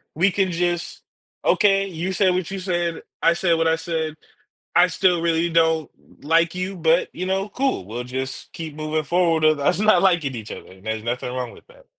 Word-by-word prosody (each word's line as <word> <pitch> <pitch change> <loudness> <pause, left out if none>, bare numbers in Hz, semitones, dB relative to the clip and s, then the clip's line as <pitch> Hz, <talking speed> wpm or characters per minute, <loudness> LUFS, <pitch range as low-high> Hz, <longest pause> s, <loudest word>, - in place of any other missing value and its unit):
we 180 +6 +3
can 190 -1 0
just, 175 0 -2 0.4
"Okay, 195 -2 +3
you 180 +1 -4
say 185 +1 +3
what 180 -1 -1
you 195 - -4
said, 175 -3 -2 0.2
I 165 - +5
said 170 -1 +1
what 165 0 +1
I 160 0 +2
said. 160 -2 -3 0.6
I 180 - +6
still 180 0 +2
really 170 0 +1
don't 160 -2 +2 0.3
like 165 +3 +2
you, 185 +2 -3
but, 165 0 +2
you 185 - -4
know, 195 +1 0
cool, 265 - -1
we'll 115 +5 -5
just 130 +2 -5
keep 160 -3 -7
moving 155 0 -2
forward 165 0 +1
with 155 -1 +4
us 175 +6 +1
not 215 +1 +4
liking 175 -8 +2
each 110 -2 -7
other, - - -8
and 95 +1 -17
there's 110 0 -3
nothing 120 +1 -3
wrong 125 -2 -4
with - - -17
that." - - -20
165 Hz, 205 wpm, -22 LUFS, 155-185 Hz, 0.6 s, I